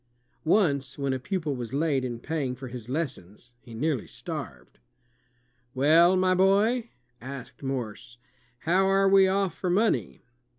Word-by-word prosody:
Once, 145 -7 +2
when 140 -2 -1
a 130 - -2
pupil 160 -1 -3
was 120 -2 -6
late 145 -3 +1
in 120 -2 -3
paying 140 -2 -3
for 130 0 -8
his 120 -1 -9
lessons, 125 - -5
he 120 -2 -12
nearly 140 0 -1
starved. - - -8 1.0
"Well, 165 +7 +5
my 185 0 +3
boy," 205 +6 +2 0.3
asked 130 0 -9
Morse, 120 -3 -5 0.4
"how 185 +4 +2
are 195 0 +3
we 195 0 +6
off 195 -1 0
for 185 - -3
money?" 175 - 0
145 Hz, 140 wpm, -27 LUFS, 125-190 Hz, 1.0 s, we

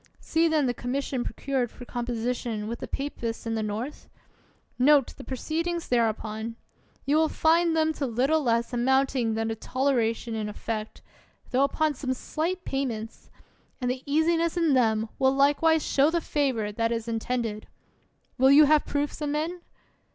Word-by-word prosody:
See 325 +1 +1
then 310 -3 +2
the 245 - +1
commission 255 +1 -2
procured 260 0 -2
for 245 - -12
composition 240 -2 -3
with 235 +1 -4
the - - -6
papists 240 -5 -4
in 225 - -2
the 220 - -1
North? 215 +7 -5 0.7
Note 280 +1 +4
the - - -10
pro 260 +2 -5
ceedings 335 +4 -2
thereupon. 225 -1 -1 0.5
You 285 +3 +3
will 315 0 +3
find 330 +1 +3
them 315 0 +2
to 280 -3 -2
little 265 +7 +1
less 235 -2 0
amounting 255 -2 +2
than 225 0 -1
a - - -2
toleration 240 -2 0
in 215 -1 -3
effect, 215 +1 -5 0.5
tho 260 +2 +3
upon 305 +2 +1
some 260 -1 -3
slight 345 +7 -3
payments; 235 -5 -4 0.5
and 250 -1 0
the 255 0 -4
easiness 330 +2 +2
in 330 -4 +3
them 220 -3 +2
will 265 0 +4
likewise 290 +3 +3
show 280 +2 +3
the 340 +1 +1
favor 265 -10 -1
that 230 +2 -1
is 230 -1 -2
in 225 -1 -1
tended. 225 -3 -3 0.7
Will 265 +1 +6
you 285 +2 +8
have 305 +1 +3
proofs 290 +1 -2
of 295 - -1
men? 320 +4 -2
260 Hz, 165 wpm, -27 LUFS, 230-300 Hz, 0.7 s, you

